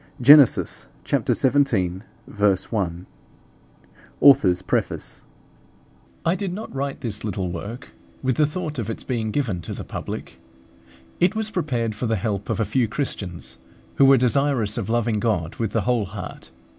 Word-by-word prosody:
Gen. 145 +4 +10
xvii. 125 - -2 0.2
1. 110 -10 +1 2.2
AUTHOR'S 125 -11 +6
PREFACE. - - -2 1.0
I 165 - +3
did 190 -1 -3
not 210 +5 -7
write 135 +1 -3
this 105 -3 -4
little 95 -4 -3
work 105 +9 -7 0.3
with 130 -2 0
the 150 -1 +4
thought 150 -3 -4
of 115 -1 -3
its 115 - -5
being 115 -4 -2
given 105 -8 -1
to - - -6
the - - -6
public. - - -7 0.8
It 180 +4 +3
was 220 0 -2
prepared 125 - -1
for 115 +3 -3
the 110 - +1
help 100 -1 -3
of - - -1
a 110 - +2
few 115 +3 +1
Christians 105 - -5 0.4
who 140 - +6
were 135 0 +7
desirous 125 -3 +1
of 105 - -4
loving 115 -2 +1
God 100 -7 -1
with 115 -2 -1
the 110 - +1
whole 120 -2 +1
heart. 95 -1 -8
120 Hz, 150 wpm, -23 LUFS, 105-140 Hz, 2.2 s, Gen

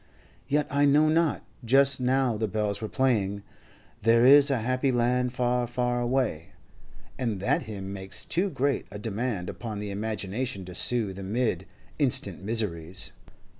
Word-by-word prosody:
Yet 150 0 +1
I 145 0 +3
know 150 +2 +4
not; 160 -1 +1 0.2
just 135 +3 +4
now 130 -1 +2
the 110 +1 -1
bells 105 0 -2
were 110 - -4
playing 105 -7 0 0.6
'There 115 +1 +4
is 140 +2 +8
a 135 - +2
happy 130 +3 +1
land, 125 +1 +1
far, 125 -1 0
far 120 0 -1
away,' 120 - -1 0.7
and 115 -6 -2
that 100 - +1
hymn 100 -2 -6
makes 95 +2 -4
too 190 +4 0
great 140 -4 -1
a 105 - -8
demand 105 -2 -3
upon 110 +1 -6
the 105 -1 -5
imagination 105 +1 -3
to 90 - -9
soothe 100 -1 -1
amid 110 +5 -1 0.3
instant - - +2
miseries. 95 -6 -1
120 Hz, 150 wpm, -27 LUFS, 100-130 Hz, 0.7 s, is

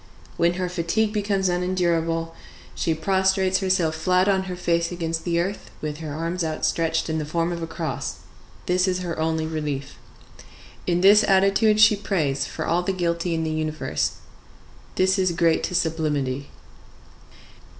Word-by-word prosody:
When 170 +1 +2
her 185 0 -2
fatigue 180 +5 0
becomes 200 -2 0
unendurable, 170 -2 0 0.4
she 165 - -1
prostrates 190 +2 +2
herself 185 -4 +1
flat 180 +4 +2
on 190 -1 +2
her 185 -1 -5
face 170 -1 0
against 165 -2 -3
the 170 -1 +1
earth, 190 +4 -3
with 150 -1 -4
her 155 -2 -6
arms 165 +4 -2
outstretched 160 +1 0
in 160 -1 -1
the - - -2
form 165 +3 -1
of 170 -1 -4
a 165 - -3
cross; 145 - -4 0.5
this 180 +1 +2
is 185 -1 0
her 170 -3 -4
only 160 0 0
relief. 150 -3 -4 0.9
In 175 0 +1
this 205 +2 +7
attitude 195 +3 +3
she 215 0 +7
prays 160 -9 -1
for - - -5
all 170 +2 +1
the 190 +2 -1
guilty 170 -1 -1
in 160 - -1
the 160 - -2
universe. 155 0 -1 0.8
This 190 +1 +2
is 185 -2 +2
great 165 -1 +2
to 180 - -4
sublimity. 150 -5 -1
170 Hz, 160 wpm, -24 LUFS, 160-185 Hz, 0.9 s, this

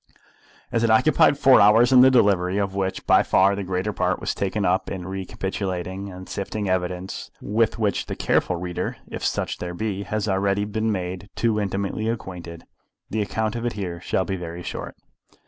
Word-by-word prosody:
As 115 - +1
it 115 - +3
occupied 130 +5 +4
four 135 -2 +6
hours 110 +5 +6
in 130 -1 +8
the 130 - +8
delivery, 100 -7 +3
of 100 -1 -1
which 95 -1 -2
by - - +5
far 95 +1 +3
the 100 - -3
greater 95 +3 -2
part 90 0 0
was - - -2
taken 100 +1 -1
up 90 +1 +1
in 95 -2 -5
recapitulating 95 0 -4
and 95 0 -10
sifting 105 +1 -4
evidence 90 0 -2
with 110 +2 0
which 105 -4 0
the - - -4
careful 90 - +1
reader, 90 0 -4
if - - -7
such - - -1
there 90 0 -5
be, 100 0 -3
has 105 +1 -2
already 100 +1 +1
been 110 +1 -1
made 95 0 -4
too 115 -2 +1
intimately 100 +2 -2
acquainted, 90 -7 -6 0.5
the 110 - 0
account 110 +2 -2
of 120 - -4
it 120 - -1
here 90 -4 -5
shall 95 - 0
be 95 - -2
very 85 0 -7
short. - - -6
100 Hz, 185 wpm, -23 LUFS, 90-110 Hz, 0.5 s, in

